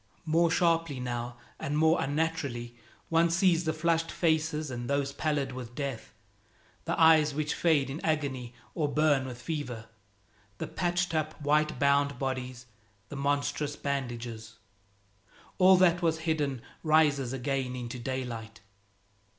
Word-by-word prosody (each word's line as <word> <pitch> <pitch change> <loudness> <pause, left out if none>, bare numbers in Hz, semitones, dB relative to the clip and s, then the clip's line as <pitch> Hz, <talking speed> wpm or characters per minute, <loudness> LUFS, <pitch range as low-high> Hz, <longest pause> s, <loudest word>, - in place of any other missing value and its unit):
More 165 +2 +3
sharply 165 -4 +1
now, 120 -1 -4 0.2
and 145 +1 -2
more 160 +1 +4
unnaturally, 140 -5 -2 0.3
one 165 +1 +4
sees 170 0 +3
the 160 - +2
flushed 165 +1 0
faces 155 -3 0
and 120 0 -5
those 140 0 0
pallid 145 -2 -1
with 125 -2 -8
death, 135 -7 -4 0.7
the - - -1
eyes 155 -3 +6
which 150 0 -1
fade 155 -5 +2
in 140 +4 -6
agony 135 -6 -2 0.2
or 155 -4 0
burn 145 -3 +2
with 125 -2 -7
fever, 125 -6 -4 0.7
the - - -3
patched 175 -1 -1
up 155 0 -2
white 150 +1 +1
bound 140 -2 +2
bodies, 130 -2 -4 0.4
the - - -7
monstrous 145 +1 -1
bandages. 120 -6 -4 1.0
All 185 0 +7
that 180 -1 +4
was 160 -1 +1
hidden 145 -6 -1 0.2
rises 150 -5 +3
again 135 -1 -2
into 125 0 -6
daylight. 120 -3 -5
145 Hz, 135 wpm, -29 LUFS, 130-160 Hz, 1.0 s, All